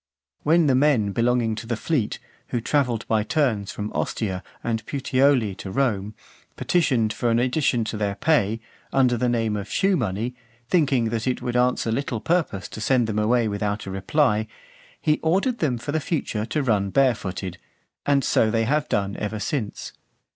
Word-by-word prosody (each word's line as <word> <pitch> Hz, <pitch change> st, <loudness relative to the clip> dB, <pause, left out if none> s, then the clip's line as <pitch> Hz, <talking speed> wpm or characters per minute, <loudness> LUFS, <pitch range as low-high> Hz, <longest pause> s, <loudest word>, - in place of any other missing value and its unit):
When 165 Hz, +2 st, +4 dB
the 140 Hz, -, +3 dB
men 130 Hz, -7 st, +3 dB
belonging 115 Hz, +1 st, +1 dB
to 115 Hz, +1 st, -6 dB
the 120 Hz, -1 st, -1 dB
fleet, 130 Hz, -5 st, -1 dB, 0.3 s
who 120 Hz, -, -1 dB
travelled 120 Hz, -2 st, 0 dB
by 110 Hz, -1 st, +2 dB
turns 110 Hz, -6 st, 0 dB
from 105 Hz, 0 st, -5 dB
Ostia 95 Hz, -4 st, -2 dB, 0.2 s
and 115 Hz, -1 st, -1 dB
Puteoli 135 Hz, -5 st, +2 dB
to 95 Hz, -, -7 dB
Rome, 105 Hz, -3 st, -1 dB, 0.4 s
petitioned 125 Hz, -11 st, +1 dB
for 120 Hz, -, -1 dB
an 115 Hz, -, +3 dB
addition 125 Hz, -1 st, +1 dB
to 110 Hz, 0 st, -4 dB
their 100 Hz, -1 st, -1 dB
pay, 110 Hz, -3 st, +1 dB, 0.3 s
under 130 Hz, -2 st, +3 dB
the 125 Hz, +1 st, 0 dB
name 115 Hz, -3 st, 0 dB
of 100 Hz, -2 st, -5 dB
shoe 195 Hz, 0 st, +2 dB
money, 115 Hz, -, -2 dB, 0.3 s
thinking 140 Hz, -9 st, +2 dB
that 115 Hz, +1 st, -2 dB
it 125 Hz, -, -1 dB
would 120 Hz, -1 st, -2 dB
answer 125 Hz, -2 st, +2 dB
little 120 Hz, -1 st, -2 dB
purpose 160 Hz, -, 0 dB
to 110 Hz, -, -8 dB
send 125 Hz, +2 st, +3 dB
them 110 Hz, -1 st, -1 dB
away 115 Hz, +2 st, +2 dB
without 105 Hz, 0 st, -2 dB
a 95 Hz, -, -5 dB
reply, 105 Hz, +2 st, +1 dB, 0.5 s
he 150 Hz, -1 st, +1 dB
ordered 195 Hz, +10 st, +1 dB
them 135 Hz, -7 st, +1 dB
for 120 Hz, +5 st, -5 dB
the 160 Hz, -, +1 dB
future 125 Hz, -9 st, -2 dB
to 150 Hz, +2 st, -1 dB
run 105 Hz, -6 st, +1 dB
barefooted; 100 Hz, -7 st, 0 dB, 0.4 s
and 140 Hz, -1 st, +2 dB
so 110 Hz, -, +3 dB
they 115 Hz, 0 st, +1 dB
have 150 Hz, +6 st, 0 dB
done 100 Hz, 0 st, 0 dB
ever 105 Hz, +1 st, -3 dB
since. 110 Hz, +1 st, -3 dB
120 Hz, 175 wpm, -24 LUFS, 105-140 Hz, 0.5 s, When